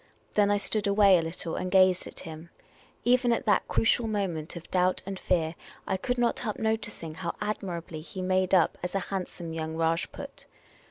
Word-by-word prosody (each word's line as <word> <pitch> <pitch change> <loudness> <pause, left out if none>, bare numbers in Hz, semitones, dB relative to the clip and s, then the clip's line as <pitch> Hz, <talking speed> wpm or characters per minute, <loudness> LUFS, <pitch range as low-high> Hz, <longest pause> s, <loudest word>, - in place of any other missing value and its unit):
Then 205 -1 +4
I 205 - +3
stood 205 0 0
away 200 -2 +6
a - - 0
little 165 0 -4
and 185 - -2
gazed 185 -1 +4
at - - -9
him. 160 -1 -9 0.6
Even 245 0 +4
at 235 - 0
that 210 - +3
crucial 225 +1 +2
moment 185 -8 -2
of 170 - -8
doubt 185 0 +2
and 195 -1 -5
fear, 165 -3 +1 0.3
I - - 0
could 245 +6 -1
not 240 -1 +1
help 215 -3 -3
noticing 220 -7 -2
how 170 +1 -4
admirably 175 -6 -4
he 185 +3 -7
made 185 0 +2
up 175 - +3
as 180 +2 -4
a - - +3
handsome 175 -3 -4
young 160 0 -3
Rajput. 165 0 -2
185 Hz, 185 wpm, -28 LUFS, 165-205 Hz, 0.6 s, away